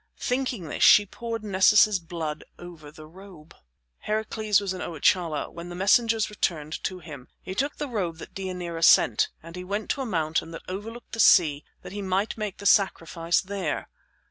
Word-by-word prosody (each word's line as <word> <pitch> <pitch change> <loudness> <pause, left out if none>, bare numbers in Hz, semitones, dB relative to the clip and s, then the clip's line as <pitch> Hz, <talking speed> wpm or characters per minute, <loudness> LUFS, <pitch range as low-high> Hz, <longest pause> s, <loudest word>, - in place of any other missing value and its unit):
Thinking 250 -8 -2
this - - -6
she 205 - +7
poured 230 +2 -6
Nessus's 205 0 +4
blood 165 -3 -5
over 170 -4 -11
the 155 +1 -13
robe. 170 -1 -15 0.5
Heracles 215 -1 0
was 200 -2 -3
in 185 - -7
Oichalia 165 -1 0
when 170 +1 -9
the 175 - -7
messengers 220 +4 +3
returned 160 -7 -3
to 185 - -3
him. 150 -7 -11 0.2
He 190 - -6
took 275 +9 -1
the 295 - -4
robe 185 -10 -3
that - - -11
Deianira 180 -3 -5
sent, - - +5
and 165 +1 -11
he 180 - -6
went 205 +3 -3
to 280 - -2
a - - -3
mountain 160 -5 -1
that 165 - -8
overlooked 220 +6 -7
the 230 - -6
sea 155 -8 +5 0.2
that - - -9
he 205 +1 -5
might 195 +2 -1
make 210 -3 -5
the 200 - -11
sacrifice 170 -4 +2
there. 190 -5 -4
185 Hz, 180 wpm, -25 LUFS, 165-210 Hz, 0.5 s, she